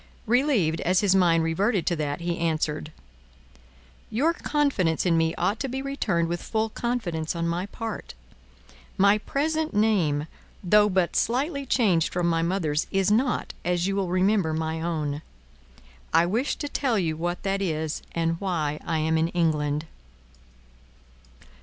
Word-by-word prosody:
Relieved 230 Hz, -, +2 dB
as 180 Hz, +1 st, +2 dB
his 200 Hz, -3 st, +3 dB
mind 170 Hz, -3 st, +4 dB
reverted 190 Hz, +4 st, +1 dB
to 175 Hz, -, +1 dB
that, 150 Hz, 0 st, -3 dB
he 170 Hz, 0 st, -2 dB
answered: 155 Hz, -2 st, -1 dB, 1.2 s
"Your 280 Hz, +10 st, +2 dB
confidence 275 Hz, -, 0 dB
in 170 Hz, -2 st, +3 dB
me 165 Hz, 0 st, +1 dB
ought 195 Hz, +5 st, 0 dB
to 270 Hz, -, -2 dB
be 265 Hz, +2 st, -3 dB
returned 235 Hz, -12 st, -1 dB
with 175 Hz, +1 st, -3 dB
full 220 Hz, 0 st, -1 dB
confidence 180 Hz, -10 st, -2 dB
on 170 Hz, 0 st, -1 dB
my 175 Hz, +3 st, -2 dB
part. 225 Hz, -, -6 dB, 0.8 s
My 200 Hz, +2 st, +5 dB
present 310 Hz, +3 st, -1 dB
name, 180 Hz, -9 st, +2 dB, 0.4 s
though 210 Hz, +3 st, +5 dB
but 185 Hz, -3 st, +1 dB
slightly 280 Hz, +3 st, 0 dB
changed 190 Hz, -11 st, +2 dB
from 175 Hz, -1 st, -1 dB
my 165 Hz, -1 st, +2 dB
mother's, 165 Hz, -4 st, 0 dB
is 195 Hz, +1 st, +1 dB
not, 245 Hz, +4 st, +1 dB
as 175 Hz, 0 st, 0 dB
you 195 Hz, 0 st, 0 dB
will 195 Hz, -3 st, -1 dB
remember, 185 Hz, -2 st, +2 dB
my 160 Hz, 0 st, -2 dB
own. 155 Hz, -3 st, -2 dB, 0.9 s
I 165 Hz, +1 st, +4 dB
wish 230 Hz, +10 st, 0 dB
to 290 Hz, -, -5 dB
tell 265 Hz, -5 st, 0 dB
you 165 Hz, -5 st, 0 dB
what 175 Hz, +2 st, -3 dB
that 195 Hz, 0 st, -1 dB
is, 160 Hz, -4 st, -2 dB
and 165 Hz, 0 st, -1 dB
why 155 Hz, -6 st, -1 dB
I 165 Hz, -, -1 dB
am 160 Hz, +1 st, +1 dB
in 160 Hz, -, +2 dB
England." 155 Hz, -3 st, 0 dB
175 Hz, 155 wpm, -25 LUFS, 160-215 Hz, 1.2 s, My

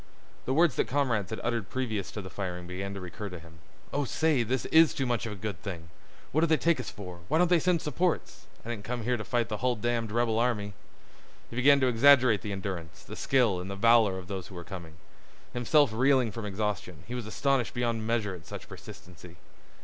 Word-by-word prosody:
The 130 Hz, -, 0 dB
words 165 Hz, -2 st, +4 dB
that -, -, +1 dB
comrades 120 Hz, -9 st, 0 dB
had 110 Hz, -, -4 dB
uttered 115 Hz, -4 st, -2 dB
previous 110 Hz, -7 st, -2 dB
to 105 Hz, -, -5 dB
the 95 Hz, -, -8 dB
firing 90 Hz, -3 st, -5 dB
began 95 Hz, +2 st, -5 dB
to -, -, -5 dB
recur 100 Hz, +3 st, -6 dB
to 90 Hz, -, -7 dB
him. 80 Hz, -1 st, -15 dB, 0.3 s
"Oh, 145 Hz, -, +1 dB
say, 150 Hz, 0 st, +1 dB
this 120 Hz, +2 st, -1 dB
is 160 Hz, -1 st, +6 dB
too 135 Hz, -, -1 dB
much 120 Hz, -2 st, -1 dB
of -, -, -5 dB
a -, -, -5 dB
good 100 Hz, -2 st, -5 dB
thing! 85 Hz, -5 st, -7 dB, 0.4 s
What 155 Hz, -, +2 dB
do 165 Hz, -, +4 dB
they 160 Hz, -1 st, +4 dB
take 165 Hz, -3 st, +2 dB
us 125 Hz, -, -4 dB
for—why 90 Hz, -, -4 dB
don't 180 Hz, +1 st, +3 dB
they 175 Hz, -, +6 dB
send 175 Hz, 0 st, +1 dB
supports? 165 Hz, +4 st, -1 dB, 0.2 s
I -, -, -7 dB
didn't 105 Hz, -3 st, -5 dB
come 120 Hz, +1 st, -4 dB
here 125 Hz, +2 st, +1 dB
to 110 Hz, -, -4 dB
fight 120 Hz, 0 st, 0 dB
the 105 Hz, -, -3 dB
hull 125 Hz, +2 st, +1 dB
damned 115 Hz, 0 st, -1 dB
rebel 115 Hz, -1 st, +1 dB
army." 105 Hz, -4 st, 0 dB, 0.8 s
He -, -, -7 dB
began 140 Hz, +3 st, +5 dB
to 130 Hz, -, +4 dB
exaggerate 125 Hz, -3 st, +5 dB
the 105 Hz, -, -5 dB
endurance, 95 Hz, -5 st, -5 dB
the -, -, -9 dB
skill, 120 Hz, -9 st, +2 dB
and 90 Hz, +2 st, -6 dB
the 100 Hz, -, -4 dB
valor 110 Hz, -2 st, +4 dB
of 90 Hz, -1 st, -8 dB
those 95 Hz, -3 st, -5 dB
who 95 Hz, -, -12 dB
were 85 Hz, -, -6 dB
coming. 85 Hz, -3 st, -9 dB, 0.6 s
Himself 125 Hz, +1 st, +3 dB
reeling 130 Hz, 0 st, +3 dB
from 105 Hz, 0 st, -5 dB
exhaustion, 100 Hz, -5 st, -3 dB
he 120 Hz, -, -6 dB
was 120 Hz, -3 st, -4 dB
astonished 135 Hz, +2 st, 0 dB
beyond 115 Hz, -2 st, -1 dB
measure 110 Hz, -4 st, 0 dB
at 90 Hz, -3 st, -11 dB
such -, -, -8 dB
persistency. 90 Hz, -1 st, -12 dB
115 Hz, 225 wpm, -29 LUFS, 95-130 Hz, 0.8 s, is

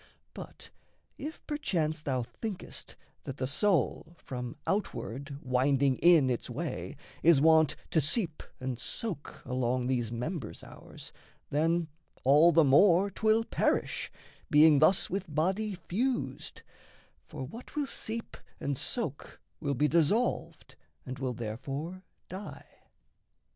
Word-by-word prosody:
But, -, -, -10 dB, 0.5 s
if 305 Hz, +3 st, -7 dB
perchance 165 Hz, -, -1 dB
thou 130 Hz, -5 st, -1 dB
thinkest 200 Hz, -, -7 dB, 0.3 s
that 135 Hz, -, -7 dB
the 130 Hz, -, -1 dB
soul, 165 Hz, -, 0 dB
From 125 Hz, -2 st, -6 dB
outward 140 Hz, -, -3 dB
winding 130 Hz, +1 st, +2 dB
in 170 Hz, -5 st, +6 dB
its 120 Hz, -, -3 dB
way, 150 Hz, +6 st, -4 dB, 0.3 s
is 165 Hz, -3 st, +6 dB
wont 160 Hz, 0 st, +5 dB, 0.2 s
To 160 Hz, -, +3 dB
seep 160 Hz, -, +1 dB, 0.2 s
and 130 Hz, -2 st, -4 dB
soak 190 Hz, -10 st, -5 dB
along 125 Hz, -1 st, 0 dB
these 120 Hz, -3 st, 0 dB
members 125 Hz, -, -4 dB
ours, -, -, -11 dB, 0.4 s
Then 165 Hz, +3 st, +1 dB, 0.4 s
all 150 Hz, +6 st, +6 dB
the 165 Hz, 0 st, +5 dB
more 175 Hz, +7 st, +5 dB
'twill 220 Hz, +3 st, +2 dB
perish, -, -, 0 dB, 0.4 s
being 150 Hz, 0 st, +7 dB
thus 175 Hz, +5 st, +4 dB
With 190 Hz, -3 st, -3 dB
body 190 Hz, +6 st, 0 dB
fused 195 Hz, -, -2 dB, 0.6 s
for -, -, -7 dB
what 225 Hz, -, -10 dB
will 295 Hz, -1 st, 0 dB
seep 230 Hz, -3 st, -4 dB, 0.2 s
and 140 Hz, -2 st, -2 dB
soak 190 Hz, -, -3 dB, 0.2 s
Will 140 Hz, -2 st, -1 dB
be 150 Hz, +4 st, +3 dB
dissolved 170 Hz, +10 st, 0 dB, 0.3 s
and 130 Hz, +1 st, -6 dB
will 130 Hz, -2 st, -2 dB
therefore 135 Hz, +11 st, -5 dB, 0.3 s
die. 190 Hz, +3 st, -8 dB
155 Hz, 120 wpm, -30 LUFS, 130-185 Hz, 0.6 s, being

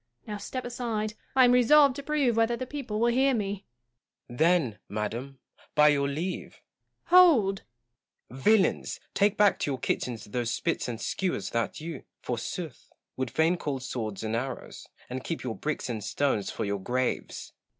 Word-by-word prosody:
Now 210 Hz, -1 st, -5 dB
step 250 Hz, +5 st, -5 dB
aside: 230 Hz, -3 st, -2 dB, 0.2 s
I 260 Hz, -1 st, +7 dB
am 245 Hz, -, +5 dB
resolved 265 Hz, +3 st, +6 dB
to -, -, -4 dB
prove 280 Hz, -5 st, +1 dB
whether 230 Hz, +1 st, +2 dB
the 255 Hz, -, -4 dB
people 255 Hz, -6 st, -4 dB
will 235 Hz, +1 st, +3 dB
hear 265 Hz, +1 st, +3 dB
me. 200 Hz, -2 st, -3 dB, 0.6 s
Gaunt. 120 Hz, -, -10 dB
Then, 160 Hz, -10 st, +3 dB
madam, 115 Hz, +6 st, -4 dB, 0.4 s
by 150 Hz, 0 st, +7 dB
your 140 Hz, -1 st, +2 dB
leave 165 Hz, +7 st, -4 dB, 0.5 s
Joanna. 365 Hz, +1 st, +10 dB
Hold! 205 Hz, -, +3 dB, 0.7 s
Gaunt. 130 Hz, +2 st, -9 dB
Villains! 215 Hz, -2 st, +3 dB
take 205 Hz, 0 st, +2 dB
back 205 Hz, -1 st, +4 dB
to -, -, -1 dB
your 135 Hz, -, -1 dB
kitchens 120 Hz, -3 st, -2 dB
those 120 Hz, +2 st, -2 dB
spits -, -, -1 dB
and 115 Hz, -2 st, -4 dB
skewers 175 Hz, -, -2 dB
that 115 Hz, -1 st, -1 dB
you, 160 Hz, -3 st, -6 dB, 0.2 s
forsooth, 125 Hz, +4 st, -5 dB, 0.3 s
would 130 Hz, -1 st, -2 dB
fain 160 Hz, +7 st, +2 dB
call 145 Hz, -5 st, -3 dB
swords 110 Hz, -6 st, -4 dB
and 110 Hz, +1 st, -1 dB
arrows; 130 Hz, +2 st, -5 dB, 0.2 s
and 130 Hz, +1 st, -5 dB
keep 165 Hz, -, -4 dB
your 120 Hz, -3 st, -3 dB
bricks 155 Hz, -3 st, -3 dB
and 110 Hz, -4 st, -4 dB
stones 115 Hz, -3 st, 0 dB
for -, -, -3 dB
your 100 Hz, 0 st, -2 dB
graves 125 Hz, +5 st, -2 dB
160 Hz, 170 wpm, -28 LUFS, -, 0.7 s, Joanna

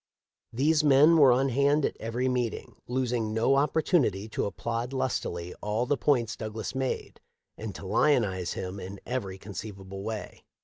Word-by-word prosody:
These 150 Hz, +6 st, +2 dB
men 150 Hz, +3 st, +6 dB
were 140 Hz, -4 st, +7 dB
on 135 Hz, +2 st, +3 dB
hand 140 Hz, +3 st, +3 dB
at -, -, -2 dB
every 120 Hz, +3 st, -2 dB
meeting, 125 Hz, -3 st, -2 dB
losing 120 Hz, -3 st, -1 dB
no 115 Hz, +4 st, +3 dB
opportunity 140 Hz, -, +2 dB
to -, -, -2 dB
applaud 115 Hz, +5 st, -3 dB
lustily 90 Hz, -10 st, -2 dB
all 105 Hz, +3 st, -1 dB
the 145 Hz, -, +1 dB
points 120 Hz, -4 st, +1 dB
Douglas 110 Hz, 0 st, -5 dB
made 130 Hz, -1 st, -3 dB, 0.3 s
and 110 Hz, -2 st, -6 dB
to -, -, -8 dB
lionize 95 Hz, -, +2 dB
him 95 Hz, +1 st, -5 dB
in 95 Hz, +1 st, -7 dB
every 110 Hz, -7 st, -3 dB
conceivable 95 Hz, -1 st, -8 dB
way. 110 Hz, +1 st, -6 dB
115 Hz, 150 wpm, -28 LUFS, 105-135 Hz, 0.3 s, were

